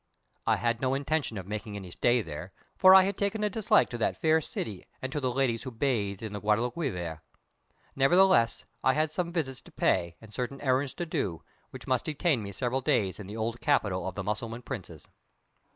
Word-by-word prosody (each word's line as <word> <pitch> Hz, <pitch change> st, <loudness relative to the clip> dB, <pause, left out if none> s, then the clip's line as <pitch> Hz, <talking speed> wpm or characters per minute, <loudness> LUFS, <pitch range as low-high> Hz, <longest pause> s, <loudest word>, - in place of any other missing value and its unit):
I -, -, +5 dB
had 120 Hz, -1 st, -1 dB
no 130 Hz, 0 st, +1 dB
intention 140 Hz, -4 st, -1 dB
of 95 Hz, -, -6 dB
making 105 Hz, +1 st, -5 dB
any 95 Hz, -3 st, -7 dB
stay 120 Hz, +5 st, +2 dB
there, 80 Hz, +3 st, -7 dB, 0.2 s
for 190 Hz, 0 st, +8 dB
I 190 Hz, -, +9 dB
had 195 Hz, 0 st, -2 dB
taken 205 Hz, +1 st, 0 dB
a 210 Hz, -, +1 dB
dislike 220 Hz, +1 st, +3 dB
to 120 Hz, -, -4 dB
that -, -, 0 dB
fair 160 Hz, 0 st, +3 dB
city, 105 Hz, -9 st, -5 dB
and 130 Hz, -, -5 dB
to 150 Hz, -, 0 dB
the 130 Hz, -3 st, 0 dB
ladies 125 Hz, -3 st, +1 dB
who 130 Hz, -, -5 dB
bathed 110 Hz, -6 st, -1 dB
in 110 Hz, -2 st, -5 dB
the 105 Hz, -, -5 dB
Guadalquivir. 105 Hz, -, -1 dB, 0.7 s
Nevertheless, 135 Hz, -3 st, +4 dB, 0.2 s
I 130 Hz, -, +4 dB
had 155 Hz, 0 st, +1 dB
some 170 Hz, +1 st, -2 dB
visits 135 Hz, -7 st, -2 dB
to -, -, -17 dB
pay, 85 Hz, -2 st, +1 dB
and 110 Hz, -1 st, -15 dB
certain 125 Hz, +4 st, -3 dB
errands 130 Hz, 0 st, +1 dB
to 175 Hz, -, -3 dB
do, 120 Hz, -, -2 dB, 0.3 s
which -, -, -10 dB
must 130 Hz, -, 0 dB
detain 150 Hz, -3 st, +1 dB
me 100 Hz, -1 st, -6 dB
several 125 Hz, +5 st, -1 dB
days 100 Hz, -6 st, +1 dB
in 100 Hz, -, -7 dB
the 105 Hz, +3 st, -7 dB
old 115 Hz, +2 st, -3 dB
capital 100 Hz, -, +1 dB
of -, -, -5 dB
the 95 Hz, -, -3 dB
Mussulman 115 Hz, +4 st, -4 dB
princes. 95 Hz, -, -7 dB
120 Hz, 205 wpm, -29 LUFS, 105-145 Hz, 0.7 s, I